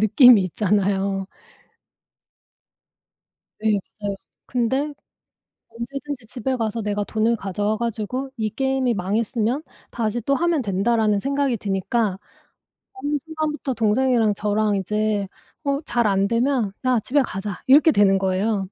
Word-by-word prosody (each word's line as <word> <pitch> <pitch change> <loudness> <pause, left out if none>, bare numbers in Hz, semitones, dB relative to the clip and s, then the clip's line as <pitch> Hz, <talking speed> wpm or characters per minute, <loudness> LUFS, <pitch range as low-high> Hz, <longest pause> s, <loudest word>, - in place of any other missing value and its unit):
느낌이 230 +1 +7
있잖아요. 195 0 0 2.3
네 215 -2 +2 0.2
맞아요. 205 -1 -2 0.3
근데 260 +5 0 0.8
언제든지 265 +1 -6
집에 255 +3 -2
가서 225 -1 -2
내가 205 0 -1
돈을 225 +2 +1
가져와 205 +2 -2
가지고 235 +3 -3
'이 220 -1 -1
게임이 265 0 0
망했으면 225 - -1 0.3
다시 230 0 -2
또 275 +5 +1
하면 335 -1 +1
된다.'라는 210 +1 +1
생각이 275 -2 0
드니까 195 0 -1 0.8
어느 295 -6 -2
순간부터 305 -4 -3
동생이랑 225 0 +2
저랑 210 0 0
이제 210 +1 -1 0.4
어 280 0 0
잘 235 -2 +1
안되면 225 +3 +1
"야 250 -2 +3
집에 280 +7 +1
가자." 195 -4 -5
이렇게 295 +4 +6
되는 200 -1 +4
거예요. 195 +2 0
225 Hz, 275 characters per minute, -22 LUFS, 205-260 Hz, 2.3 s, 느낌이